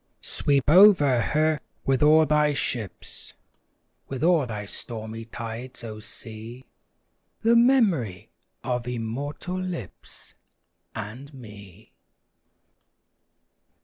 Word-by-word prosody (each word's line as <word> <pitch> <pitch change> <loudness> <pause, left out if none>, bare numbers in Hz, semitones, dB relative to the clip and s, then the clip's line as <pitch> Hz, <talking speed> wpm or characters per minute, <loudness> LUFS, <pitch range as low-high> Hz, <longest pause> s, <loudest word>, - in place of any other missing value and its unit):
Sweep 140 -2 +1
over 155 - +6
her 155 +2 +1 0.3
with 135 -2 +1
all 155 +1 +6
thy 150 -1 +2
ships, 115 -8 -4 0.7
With 135 0 -5
all 165 -6 +3
thy 105 -3 -5
stormy 110 +1 -4
tides, 115 +3 -7
O 110 -2 -7
sea! 115 +3 -10 0.8
The 230 +1 +4
memory 210 - +2 0.3
of 125 -1 -2
immortal 135 +10 -4
lips, 180 - -8 0.6
And 120 +7 -7
me! 105 -7 -13
130 Hz, 90 wpm, -25 LUFS, 115-155 Hz, 0.8 s, over